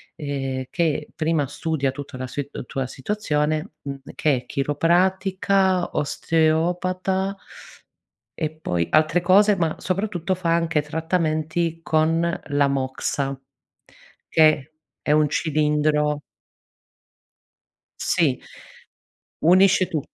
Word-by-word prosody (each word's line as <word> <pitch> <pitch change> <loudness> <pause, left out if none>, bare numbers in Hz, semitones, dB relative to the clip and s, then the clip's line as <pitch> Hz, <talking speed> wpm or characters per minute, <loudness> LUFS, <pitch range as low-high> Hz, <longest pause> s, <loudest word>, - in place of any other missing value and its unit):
ehm, 135 -3 -3
che 155 -3 0
prima 155 -3 0
studia 145 -1 -1
tutta 135 -1 -8
la 130 0 -4
sit 140 -1 -6
tua 135 0 -3
situazione, 155 -1 -1
mhmm, 140 -1 -5 0.2
che 150 -3 +2
è 125 0 -5
chiropratica, 185 +6 +1
osteopata 180 +6 0 1.0
e 155 -2 0
poi 90 - -2
altre 155 +3 +3
cose 200 +4 +5
ma 165 -4 0
soprattutto 185 -1 -1
fa 170 -2 0
anche 165 -2 +1
trattamenti 160 +1 -1
con 160 0 +2 0.3
la 145 -1 +2
moxa, 135 0 -2 0.9
che 155 -2 +3 0.3
è - - -1
un 150 -1 +3
cilindro 150 -1 +1 1.8
Sì, 140 -7 +1 1.1
unisce 185 +1 +5
tut 155 -4 -3
155 Hz, 100 wpm, -23 LUFS, 145-175 Hz, 1.8 s, cose